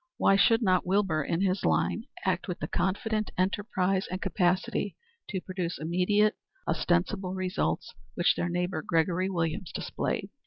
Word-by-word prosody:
Why 195 - +4
should 225 +4 +4
not 185 -3 +3
Wilbur, 185 -5 +1
in 165 +5 -1
his 195 0 +1
line, 225 - +1 0.2
act 185 0 0
with 180 - -3
the - - -4
confident 215 +4 -1
enterprise 190 0 0
and 185 - -3
capacity 190 +1 0 0.3
to 190 -3 -2
produce 180 -2 -3
immediate, 185 +6 +2 0.3
ostensible 180 +2 0
results 185 +1 -1 0.2
which - - +4
their 175 - -1
neighbor, 180 -1 -1
Gregory 170 +4 +1
Williams, 165 -1 -2
displayed? - - -3
185 Hz, 145 wpm, -29 LUFS, 175-195 Hz, 0.3 s, Why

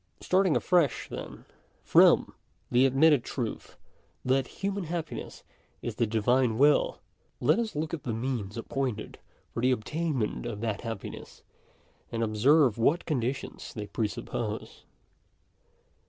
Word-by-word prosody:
Starting 185 -3 +3
afresh 175 -8 +2
then, - - -8 0.4
from - - +5 0.4
the 125 +2 +5
admitted 140 0 +4
truth, 120 -5 -5 0.5
that 130 +1 +2
human 200 -1 -3
happiness 165 -1 -5 0.4
is - - -3
the 115 - +2
Divine 115 +2 +2
will, 145 +3 +4 0.4
let - - +3
ns 225 -6 -2
look 155 +2 -3
at 165 - -3
the 125 - -3
means 115 -3 -3
appointed 120 -1 -3 0.3
for 115 - -3
the 125 - +3
obtainmetit 130 -1 -2
of 110 -4 -5
that 110 -3 -2
happiness, 115 -4 -7 0.7
and 115 0 -1
observe 120 +3 +4
what 155 +9 +2
conditions 130 -4 -3
they 105 -2 -4
presuppose. 105 +1 -4
130 Hz, 125 wpm, -28 LUFS, 115-155 Hz, 0.7 s, from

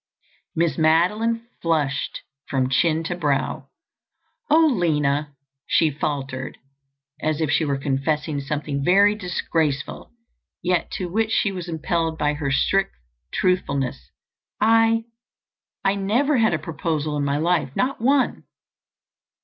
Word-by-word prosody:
Miss 165 0 +1
Madeline 210 +9 +2 0.2
flushed 150 -5 -1 0.3
from 130 -2 +1
chin 160 +3 +2
to 175 +2 -3
brow. 145 -5 -1 0.8
"Oh, 320 +2 +6
Lina," 150 - +1 0.3
she 160 -2 +3
faltered 135 -3 -4 0.6
as 155 0 0
if 155 -3 0
she 160 - +2
were 140 -2 0
confessing 145 +2 -1
something 140 0 -3
very 200 +5 +5
disgraceful, 165 -7 -2 0.5
yet 180 -1 +1
to 185 - -3
which 220 +5 0
she 210 -2 +1
was 180 -2 -6
impelled 160 0 -1
by 150 -1 +1
her 145 -2 -3
strict 195 +8 +1 0.4
truthfulness, 140 -8 -1 0.5
"I—I—never 225 +1 0
had 220 -7 +3
a - - 0
proposal 155 -1 -3
in 145 - -1
my 140 0 0
life—not 175 - 0
one." 270 +2 +2
165 Hz, 115 wpm, -23 LUFS, 145-200 Hz, 0.8 s, Oh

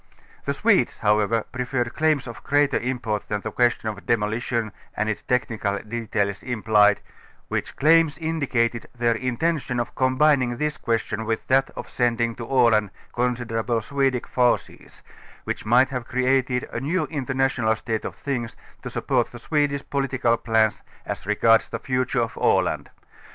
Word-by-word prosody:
The - - 0
Swedes, - - +2
however, 105 +2 +2
preferred 125 -1 -2
claims 155 -3 +1
of 120 -2 -9
greater 145 -1 +2
import 120 -4 -3
than 105 -1 -2
the - - -5
question 120 -2 +1
of 105 -2 -5
demolition 115 0 0 0.3
and 110 - 0
its 110 - -2
technical 110 -5 -1
details 105 -2 -2
im 120 -4 -4
plied, 105 -2 +4 0.5
which - - -3
claims 160 -1 +4
indicated 135 -8 -1
their 120 -1 +2
intention 130 +2 -1
of 120 - -3
combining 130 -1 +2
this 150 +2 -1
question 115 -1 -1
with 110 0 -2
that 135 +1 +3
of - - -6
sending 120 -1 0
to 115 - -6
Aland 115 -5 +3 0.2
considerable 120 -1 -1
Swe 140 +3 +1
dish 125 -2 -3
forces, 125 -1 -1 0.4
which - - -4
might 125 +4 +5
have 125 -3 -4
created 130 0 +1
a - - -2
new 155 +9 0
international 135 -5 0
state 110 +1 -3
of - - -5
things 120 -5 -4 0.3
to - - -6
support - - 0
the 120 - -9
Swedish 140 +2 -1
political 130 -4 +1
plans 110 -2 +1 0.2
as - - -5
regards 115 +2 +3
the - - -3
future 130 -1 0
of - - -5
Aland. - - +1
120 Hz, 155 wpm, -24 LUFS, 115-135 Hz, 0.5 s, might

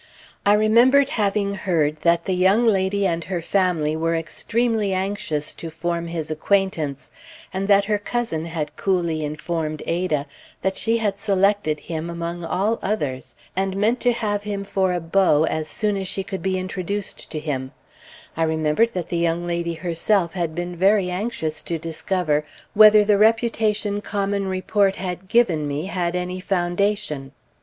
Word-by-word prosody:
I 205 - +7
remembered 240 +6 +5
having 200 -5 0
heard 160 -6 0
that 170 +1 +2
the 190 - 0
young 190 +6 +3
lady 200 -2 +2
and 170 -2 0
her 180 -2 -2
family 170 -4 +1
were 165 +1 0
extremely 215 +5 0
anxious 185 -6 -2
to 165 - -7
form 170 +1 -3
his 165 -2 -4
acquaintance, 155 -6 -1 0.4
and 190 +1 -2
that 200 -1 +5
her 210 0 0
cousin 205 -7 -2
had 155 -3 -4
coolly 170 -5 0
informed 155 +1 -3
Ada 165 -4 0 0.4
that 190 +1 0
she 230 +3 +1
had 205 -3 -1
selected 195 -6 +1
him 165 0 -5
among 170 0 -4
all 200 +7 0
others, 130 - -3 0.2
and 190 0 -1
meant 225 +5 +2
to 245 - +3
have 210 -3 -1
him 205 -1 -4
for 190 -1 0
a 180 - 0
"beau" 165 -2 +3
as 155 -1 -1
soon 210 +4 -1
as 190 -1 -3
she 190 +1 -2
could 190 0 -5
be 190 -1 0
introduced 185 +2 -4
to 155 - -5
him; 135 -4 -3 0.6
I 165 - -3
remembered 160 +8 +2
that 180 -3 -3
the 170 - -1
young 170 0 0
lady 170 -1 -2
herself 170 +1 0
had 170 -4 -2
been 175 0 -4
very 190 +1 +3
anxious 180 -5 -3
to 170 - -3
discover 165 -1 -1 0.3
whether 215 0 +8
the 205 -1 +3
reputation 215 -2 +2
common 200 -1 -1
report 195 +1 +1
had 185 0 -5
given 185 -10 +2
me 145 +3 -3
had 180 -2 -2
any 180 +1 -3
foundation. 180 -5 -1
185 Hz, 165 wpm, -22 LUFS, 165-205 Hz, 0.6 s, whether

